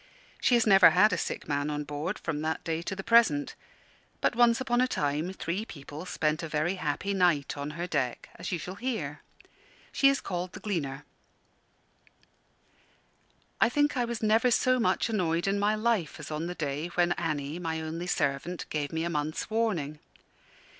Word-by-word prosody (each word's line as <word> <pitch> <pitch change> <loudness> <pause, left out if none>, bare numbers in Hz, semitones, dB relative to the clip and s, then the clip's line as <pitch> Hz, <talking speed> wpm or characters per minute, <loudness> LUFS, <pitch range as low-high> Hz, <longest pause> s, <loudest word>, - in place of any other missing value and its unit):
She 245 - +4
has 235 - +3
never 195 -3 +8
had 210 +4 +4
a - - +3
sick - - -4
man 145 0 -1
on 150 0 -2
board 150 +7 -4
from 150 -3 -3
that 160 +1 -2
day 165 0 -2
to 195 - -4
the 195 - -6
present. 225 -11 +4 0.7
But - - +1
once 235 -1 +5
upon 245 -2 +1
a 255 - +3
time 150 - -1
three 190 +2 -3
people 150 -2 -9
spent 155 -3 0
a 165 - -4
very 155 +4 0
happy 180 +5 -2
night 175 -7 +2
on 145 0 -4
her 175 - -2
deck, 140 -8 -2
as - - -6
you 180 - 0
shall 180 +3 -6
hear. 250 -2 -3 0.7
She 275 - +5
is 275 - +1
called 180 0 -4
The - - -8
Gleaner. 150 -9 -3 2.5
I - - +5
think 290 +3 +2
I 245 -2 +1
was 235 -1 -4
never 225 +3 +4
so 255 +1 +3
much 230 - +2
annoyed 175 -7 0
in 195 +1 +1
my 210 +1 +2
life 215 -9 0
as 155 0 -8
on 155 +2 -2
the 180 - -5
day 150 0 -3
when 175 0 +3
Annie, 155 -2 -2
my 165 -2 -2
only 160 +2 -4
servant, 150 +2 -1
gave 145 -2 -2
me 160 0 -1
a 170 - -1
month's 155 +5 -3
"warning." 175 -10 -1
175 Hz, 185 wpm, -29 LUFS, 150-215 Hz, 2.5 s, never